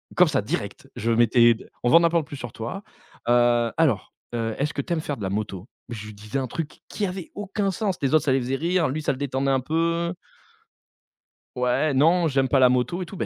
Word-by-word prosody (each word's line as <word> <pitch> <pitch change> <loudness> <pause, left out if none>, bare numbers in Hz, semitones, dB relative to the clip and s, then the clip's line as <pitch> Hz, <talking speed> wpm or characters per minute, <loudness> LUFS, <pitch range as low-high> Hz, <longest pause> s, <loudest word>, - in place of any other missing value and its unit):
comme - - +6
ça - - +1
direct, - - -5
je 115 +2 -1
mettais: 120 0 +5 0.3
«On 120 - +3
veut - - +5
en 170 - +7
apprendre 170 -2 +2
plus 145 - -8
sur 120 -3 -7
toi, 120 - -6 0.5
heu, 120 -1 +3
alors, 135 -12 +1 0.2
heu, 115 -1 -2
est-ce 145 +2 -1
que 140 - -2
tu 175 - -10
aimes 160 - -1
faire 145 -2 -4
de 110 - -11
la 95 - -1
moto?», 100 +1 -4 0.2
je 110 -3 -7
lui 110 - -9
disais 105 +6 -4
un 130 - -2
truc 155 +5 -5
qui 210 - -2
avait 185 -2 -5
aucun 205 0 -2
sens, 195 -2 -2
les 135 0 0
autres, 155 - +3
ça 135 - +2
les 135 - +3
faisait 130 +2 -1
rire, 170 +3 +1
lui, 150 +4 -3
ça - - +1
le 130 - -5
détendait 135 -1 0
un 135 - +3
peu 165 +4 0 1.4
«Ouais, 125 +5 +1
non, 165 +5 +4
j'aime 135 -2 +1
pas 135 - +3
la 125 - +6
moto 125 +8 0
et - - -3
tout», 195 - -9
135 Hz, 235 wpm, -24 LUFS, 120-165 Hz, 1.4 s, en